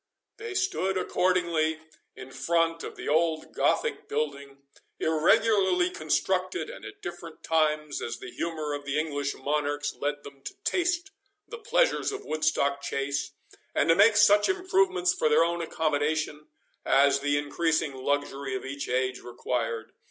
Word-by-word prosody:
They 435 -2 -6
stood 360 - 0
accordingly 170 -4 +1 0.4
in 130 - -10
front 165 +2 0
of - - -7
the - - -8
old 160 +1 +1
Gothic - - 0
building, 140 -2 -3 0.4
irregularly 180 +3 +3
constructed, 185 - -1
and - - -11
at 405 +1 -11
different 165 - -8
times, 155 -2 +1
as - - -4
the 375 -2 -9
humour 155 - -3
of 145 0 -4
the 140 +1 -2
English 145 -3 -1
monarchs 145 +1 -1
led 145 0 -3
them 140 -1 -12
to - - -6
taste 355 +1 0 0.4
the 470 - -8
pleasures 465 +2 +1
of 410 0 -7
Woodstock 150 -3 0
Chase, 140 0 -2 0.5
and 155 - +2
to 165 - +7
make 210 +3 +6
such 205 0 +6
improvements 370 - +2
for 155 - +1
their 155 +2 +5
own 170 0 -1
accommodation 155 -1 -1 0.4
as 140 0 +4
the 145 +1 +1
increasing 150 0 0
luxury 135 0 -2
of 130 - -5
each 140 +1 -5
age 130 0 0
required. 120 -2 -3
155 Hz, 145 wpm, -27 LUFS, 145-185 Hz, 0.5 s, to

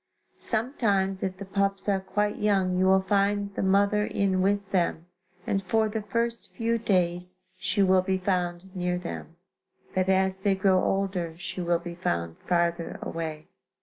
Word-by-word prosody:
Sometimes 205 -5 +1
if 185 -1 -2
the 200 - -7
pups 195 0 -1
are 195 -1 +2
quite 205 +2 -1
young 195 -3 +2
you 185 +1 +2
will 190 0 +4
find 200 +1 +1
the - - -3
mother 200 +2 +3
in 195 -3 +1
with 200 +1 0
them 170 -3 0 0.4
and 195 - 0
for 220 +3 +1
the 220 +1 -3
first 230 +3 -2
few 230 0 0
days 180 -3 0 0.2
she 200 +2 +1
will 185 -1 +5
be 190 0 0
found 180 0 -2
near 180 -1 0
them, 170 -1 -7 0.6
but 185 0 +1
as 190 0 +2
they 195 0 +1
grow 190 -1 +3
older 190 -4 -1
she 180 +1 -5
will 170 0 +2
be 170 0 -7
found 85 - -2
farther 170 -1 0
away. 160 -2 -5
190 Hz, 165 wpm, -27 LUFS, 180-200 Hz, 0.6 s, will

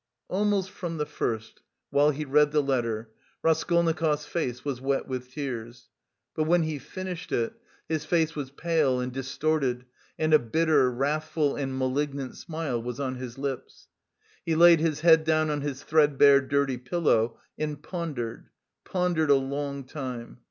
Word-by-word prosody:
Almost 195 -1 +1
from 170 -4 -5
the 150 - -1
first, 110 -6 -4 0.3
while 145 +1 +4
he 150 +1 -2
read 150 +1 +4
the 150 -1 +2
letter, 115 -5 -1 0.3
Raskolnikov's 160 -1 +2
face 125 -7 -3
was 135 -4 -3
wet 135 +1 0
with 125 -1 -5
tears; 120 -4 -6 0.4
but 155 - 0
when 170 +1 +3
he 155 -2 -3
finished 180 +5 -7
it, 115 -1 0 0.3
his 160 -1 -1
face 160 0 +1
was 145 -3 -4
pale 145 -3 +1
and 125 0 -3
distorted 135 -1 -1 0.3
and 155 0 +1
a 155 - +8
bitter, 145 +2 +2
wrathful 145 +3 0
and 135 -2 -3
malignant 135 +1 -2
smile 155 -8 -3
was 125 +1 -5
on 130 -2 -2
his 125 -1 -7
lips. 135 -2 -5 0.5
He 165 - 0
laid 170 0 +7
his 155 -2 0
head 160 -1 +6
down 155 -1 +2
on 145 -1 -1
his 140 -2 -4
threadbare 145 -2 +5
dirty 135 -1 0
pillow 125 -6 +1 0.2
and 150 -1 -3
pondered, 150 -11 -5 0.3
pondered 175 -4 0
a 140 - +7
long 140 +1 -2
time. 130 -3 -7
145 Hz, 155 wpm, -27 LUFS, 130-160 Hz, 0.5 s, a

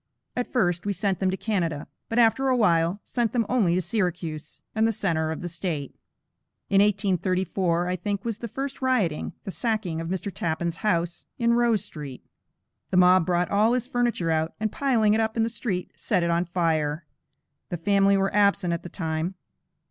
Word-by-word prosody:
At 245 - -2
first, 175 -8 +1
we 200 - +1
sent 195 0 -1
them 190 - +1
to 190 - -1
Canada, 170 -10 -1 0.2
but 225 - -2
after 240 +3 +4
a 255 -1 +3
while, 170 -3 +2
sent 240 -3 -1
them 235 -3 +2
only 210 -9 +2
to 185 - +1
Syracuse, 175 -5 -3
and 220 0 +2
the - - +2
centre 165 -7 0
of 160 - -5
the 175 - -3
State. 165 -5 -4 0.8
In 195 0 +6
1834, 185 -3 +1
I 180 - 0
think, 200 +3 -3
was 230 -2 -3
the 235 - -4
first 270 +5 -5
rioting, 220 -12 0
the 195 - -5
sacking 210 -8 -2
of 165 - -5
Mr. 190 +2 -3
Tappan's 165 0 -2
house, 175 -5 -1
in 235 0 +2
Rose 235 -4 +2
Street. 145 -8 -8 0.6
The 180 - +1
mob 180 -1 +6
brought 180 0 +1
all 215 +3 +4
his 250 -1 0
furniture 240 -9 0
out, 160 0 0
and 215 -1 -1
piling 230 -7 +2
it 220 - +2
up 220 +1 -1
in 225 - +3
the 225 - 0
street, 195 -6 -3
set 185 -5 0
it 170 - +1
on 170 +1 +1
fire. 160 -3 0 0.6
The 175 - -3
family 195 +3 +3
were 195 0 0
absent 200 -4 +3
at 170 - -3
the 175 - -8
time. 160 +1 -3
190 Hz, 195 wpm, -25 LUFS, 170-220 Hz, 0.8 s, In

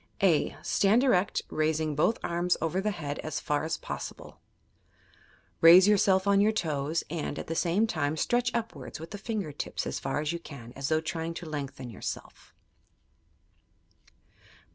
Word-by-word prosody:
(a) 170 -6 +3
Stand 215 +5 +3
erect, 195 -8 +2
raising 155 0 0
both 190 +10 +2
arms 175 +1 0
over 170 +3 -1
the 210 - 0
head 145 -8 -4
as 155 -1 -3
far 150 0 -1
as 160 +1 -2
possible. - - -7 1.2
Raise 175 +4 +9
yourself 195 -2 +4
on 200 0 +4
your 210 +2 +4
toes 155 -5 -1
and, 160 -3 -3
at - - -5
the 165 - -3
same 175 +6 +2
time, 155 -7 -1
stretch 240 +8 +1
upwards 180 - -4
with 165 +1 -9
the 205 - -6
finger 205 -7 -3
tips 145 - -4
as - - -3
far 135 - -2
as 150 +2 -1
you 170 - -3
can, 125 -7 -11
as 135 0 -3
though 155 0 +2
trying 165 +1 -4
to 175 - -6
lengthen 140 -5 -5
yourself. 100 - -7
165 Hz, 165 wpm, -29 LUFS, 150-195 Hz, 1.2 s, Raise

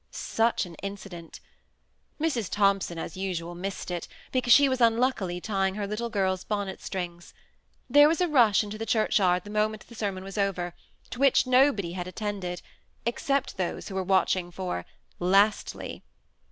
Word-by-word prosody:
Such 225 -2 0
an 175 - -10
incident 195 -4 -8 0.8
I - - -4
Mrs. 240 - 0
Thompson, 195 -4 +1
as 165 - -5
usual, 180 -3 -3
missed 185 +1 -5
it, 175 -2 -4 0.2
because 255 -2 +1
she 280 +4 +8
was 260 -1 -1
unluckily 230 -6 +2
tying 195 -1 -1
her 205 -1 -2
little 215 +4 -3
girl's* 190 -3 0
bonnet 205 -3 -3
strings. 175 -2 -6 0.5
There 290 +3 +7
was 320 +1 +1
a 360 - +2
rush 235 - +4
into 210 +1 -7
the 225 - -4
church 220 0 +2
yard 180 -2 +2
the 205 - -9
moment 215 0 0
the 235 - -13
sermon 200 -4 -3
was 195 +2 -6
over, 180 -3 -1 0.4
to 245 - -6
which 275 -2 +4
nobody 255 -8 +3
had 180 0 -5
attended, 190 -2 -4 0.4
except 275 +2 -1
those 185 -2 -3
who - - -7
were 190 - -1
watching 185 -1 +1
for 175 - -4 0.2
" 65 - -37 0.2
Lastly." 210 +2 +1
200 Hz, 170 wpm, -27 LUFS, 185-230 Hz, 0.8 s, she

